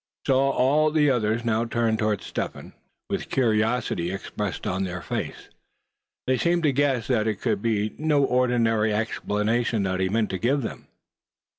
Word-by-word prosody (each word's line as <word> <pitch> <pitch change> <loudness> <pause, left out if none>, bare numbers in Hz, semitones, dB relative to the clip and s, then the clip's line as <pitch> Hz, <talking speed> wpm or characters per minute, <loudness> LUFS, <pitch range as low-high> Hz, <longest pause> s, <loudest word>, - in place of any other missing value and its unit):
So 135 - +3
all 135 +3 +3
the 150 -2 +3
others 115 -1 0
now 115 0 +1
turned 115 -1 0
toward 105 -2 0
Step - - -4
Hen, - - -12 0.3
with - - -3
curiosity 110 -7 +1
expressed 95 +1 -4
on 95 +1 -1
their 90 -1 -5
faces; - - -4
for - - -26 0.7
they 130 0 +2
seemed 170 0 +1
to 150 - +4
guess 135 -4 +1
that 110 0 +1
it 105 -3 -1
could - - -1
be 110 -2 0
no 150 -2 +2
ordinary 120 -4 +2
explanation 110 +1 0
that 95 -1 -1
he 95 0 +1
meant 110 +1 0
to 95 - -3
give 135 +5 +1
them. - - -7
115 Hz, 170 wpm, -25 LUFS, 105-130 Hz, 0.7 s, to